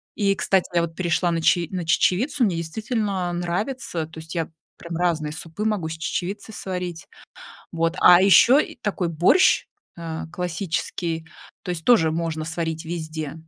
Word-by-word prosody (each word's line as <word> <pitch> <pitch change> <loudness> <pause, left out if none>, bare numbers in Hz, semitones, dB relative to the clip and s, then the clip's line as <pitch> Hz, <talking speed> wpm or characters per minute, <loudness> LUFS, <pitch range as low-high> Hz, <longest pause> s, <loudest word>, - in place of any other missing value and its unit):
И, 200 -2 +2
кстати, 190 -2 +1
я 170 - +4
вот 165 -1 -4
перешла 175 -1 +1
на 165 -1 -1
че 170 0 +3
на 180 -3 -3
чечевицу, 245 - +2
мне 190 -6 +2
действительно 195 0 -2
нравится. 175 - -3
То 160 0 -11
есть 160 +2 -9
я 165 -2 -1 0.3
прям 170 -1 -7
разные 160 -4 0
супы 165 +6 -6
могу 200 -7 0
с - - -4
чечевицы 190 +5 -4
сварить. 180 -4 -5 0.7
Вот, 165 +1 0
а 180 +1 +8
ещё 235 +7 +7
и - - -2
такой 190 -4 -2
борщ, 175 - +4 0.3
а, 165 -2 -5
классический, 170 -1 -3 0.4
то 180 - -5
есть 165 -2 -4
тоже 170 -10 +5
можно 160 -1 -2
сварить 160 0 -3
везде 155 -3 -5
175 Hz, 160 wpm, -23 LUFS, 160-190 Hz, 0.7 s, а